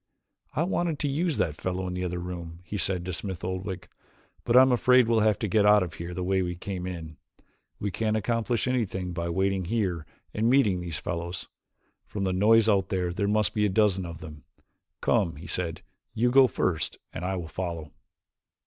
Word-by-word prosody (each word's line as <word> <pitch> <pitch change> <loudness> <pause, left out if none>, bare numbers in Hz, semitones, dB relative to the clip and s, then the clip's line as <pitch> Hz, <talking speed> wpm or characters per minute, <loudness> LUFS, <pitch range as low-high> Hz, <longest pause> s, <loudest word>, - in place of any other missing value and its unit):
"I 155 - +2
wanted 175 -3 0
to 145 - -1
use 155 +2 0
that 75 - +1
fellow 90 +4 -3
in 90 - -3
the 90 0 -3
other 90 -1 -2
room," 85 -1 -6
he 95 - -7
said 95 -3 +1
to 95 - -3
Smith 95 -1 -5
Oldwick, 95 0 -4 0.6
"but 120 +1 +4
I - - +11
am 130 - +3
afraid 125 0 +5
we 115 - +2
will 115 - +4
have 105 -1 +3
to 110 - -2
get 105 +2 +3
out 105 -1 +6
of 85 -2 -6
here 85 +1 -6
the 90 - -2
way 95 +1 +1
we 90 -1 -2
came. 90 -4 -6 0.6
We 100 - -3
can't 110 +3 0
accomplish 115 +2 0
anything 95 -8 -1
by 85 0 -3
waiting 95 +1 0
here 90 -6 -1 0.3
and 110 +2 +1
meeting 110 -9 +3
these 85 -4 -4
fellows. 85 +1 -5 0.6
From 100 - -4
the 95 -1 0
noise 110 +4 +5
out 100 -3 +2
there 90 -3 -1
there 100 +3 -1
must 105 0 +2
be 105 - +1
a - - -1
dozen 95 -2 +2
of 85 0 -8
them. 75 -1 -10 0.6
Come," 85 - +2
he 80 +4 -10
said, 85 -1 -3 0.3
"you 120 +2 +2
go 135 0 +7
first 90 -7 -1 0.2
and 85 - -5
I 95 +1 -1
will 85 -3 -4
follow." 85 -3 -5
95 Hz, 205 wpm, -27 LUFS, 85-110 Hz, 0.6 s, I